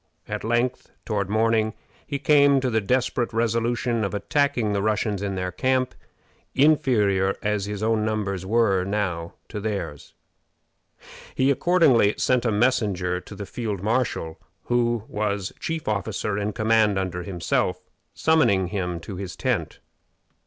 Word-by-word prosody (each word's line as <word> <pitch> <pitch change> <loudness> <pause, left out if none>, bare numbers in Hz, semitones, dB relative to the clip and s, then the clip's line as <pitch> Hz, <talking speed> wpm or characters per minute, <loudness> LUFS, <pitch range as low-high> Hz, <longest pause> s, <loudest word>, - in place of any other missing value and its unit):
At - - -4
length, 120 +3 0 0.2
toward 100 -3 -1
morning, 110 0 +2 0.3
he 140 - -2
came 140 0 +5
to 130 -1 -1
the 110 -1 +2
desperate 125 +2 0
resolution 115 +1 0
of 100 0 -2
attacking 125 -1 +1
the 100 - 0
Russians 105 -1 0
in 100 -1 -2
their 90 0 -2
camp, 130 +6 0 0.6
inferior 105 -10 +3
as 105 -1 0
his 105 0 -4
own 110 -1 +2
numbers 105 -4 -2
were 100 -2 +2
now 95 -4 -2
to 105 - -5
theirs. 100 -9 -5 1.2
He 130 +1 +3
accordingly 140 - +4
sent 125 -1 +1
a 115 - +2
messenger 105 -6 +1
to 100 - -11
the 100 0 -6
field 105 -2 -4
marshal, 110 -8 -1 0.2
who 120 -2 +1
was 100 -2 -2
chief 160 -2 -4
officer 105 0 -1
in 105 +1 -2
command 110 -2 +3
under 90 -2 -2
himself, 90 0 -1 0.4
summoning 100 - +3
him 90 -4 -3
to 95 +2 -7
his 95 -3 -6
tent. - - -2
105 Hz, 140 wpm, -24 LUFS, 100-120 Hz, 1.2 s, came